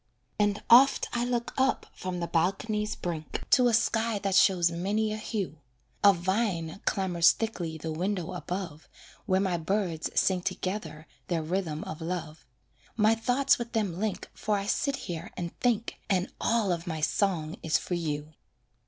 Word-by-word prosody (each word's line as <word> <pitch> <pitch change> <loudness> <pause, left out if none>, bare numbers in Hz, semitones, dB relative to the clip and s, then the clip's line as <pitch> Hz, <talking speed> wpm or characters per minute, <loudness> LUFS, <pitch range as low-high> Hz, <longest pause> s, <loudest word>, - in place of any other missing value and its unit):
And 205 0 +1
oft 260 +4 +6
I 240 - 0
look 240 -1 -2
up 265 0 +2
from 185 -1 -4
the 170 - -1
balcony's 210 +6 0
brink 165 -3 -4
To 250 -1 +6
a 235 - +2
sky 225 -1 +1
that 195 -1 -2
shows 180 -3 +5
many 205 +5 0
a - - -3
hue; 200 -8 -4 0.4
A 200 - +9
vine 190 -2 -1
clambers 175 -3 +3
thickly 175 -8 -3
the 160 +1 -5
window 180 +1 -2
above, 175 -4 -5 0.4
Where 190 -2 +3
my 190 -3 +1
birds 170 -1 -1
sing 185 -2 +2
together 185 -4 -4 0.2
their 165 -3 -1
rhythm 165 -2 -2
of 155 - -7
love; 165 -2 -5 0.5
My 215 0 +5
thoughts 245 +5 +2
with 235 0 -5
them 200 -6 -1
link 215 -1 -2
For 210 -1 -1
I 195 - -3
sit 275 +6 0
here 170 +1 -5
and 170 -1 -4
think 235 -2 0
And 185 -2 0
all 225 -5 +2
of 170 0 -3
my 160 -2 -3
song 165 -2 0
is 155 -2 +2
for - - -5
you. 155 -3 -3
190 Hz, 165 wpm, -28 LUFS, 170-215 Hz, 0.5 s, A